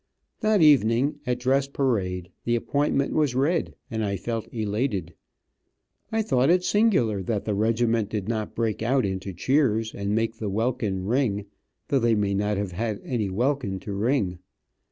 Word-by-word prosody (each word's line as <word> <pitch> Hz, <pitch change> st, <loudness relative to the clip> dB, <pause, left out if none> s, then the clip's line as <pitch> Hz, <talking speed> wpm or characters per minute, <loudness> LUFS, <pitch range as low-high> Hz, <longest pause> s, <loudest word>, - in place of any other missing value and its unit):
That 215 Hz, -5 st, +3 dB
evening 140 Hz, 0 st, +4 dB
at 125 Hz, -1 st, +1 dB
dress 135 Hz, +2 st, +1 dB
parade 100 Hz, -11 st, -1 dB
the 120 Hz, -, +1 dB
appointment 140 Hz, +3 st, 0 dB
was 145 Hz, -5 st, +1 dB
read, 155 Hz, +6 st, +1 dB, 0.2 s
and 110 Hz, -1 st, -1 dB
I 100 Hz, -1 st, -1 dB
felt 115 Hz, +3 st, -4 dB
elated. 105 Hz, -, -2 dB, 1.0 s
I 220 Hz, 0 st, +1 dB
thought 130 Hz, -, +2 dB
it 180 Hz, +1 st, +4 dB
singular 180 Hz, -, +2 dB
that 100 Hz, +2 st, -2 dB
the 105 Hz, -, 0 dB
regiment 115 Hz, +1 st, +1 dB
did 105 Hz, -3 st, -3 dB
not 110 Hz, -2 st, -3 dB
break 110 Hz, -3 st, -1 dB
out 130 Hz, +2 st, +2 dB
into 95 Hz, 0 st, -3 dB
cheers, 115 Hz, -, +1 dB
and 100 Hz, +1 st, -2 dB
make 115 Hz, 0 st, -1 dB
the 110 Hz, -2 st, -3 dB
welkin 110 Hz, -3 st, -1 dB
ring, 110 Hz, -3 st, 0 dB, 0.4 s
though 140 Hz, -3 st, +3 dB
they 115 Hz, -2 st, +3 dB
may 100 Hz, -1 st, 0 dB
not 105 Hz, +1 st, 0 dB
have 100 Hz, -2 st, -2 dB
had 105 Hz, +3 st, -2 dB
any 115 Hz, -6 st, -1 dB
welkin 120 Hz, -1 st, -1 dB
to 105 Hz, -, -5 dB
ring. 100 Hz, -4 st, 0 dB
115 Hz, 165 wpm, -25 LUFS, 100-135 Hz, 1.0 s, evening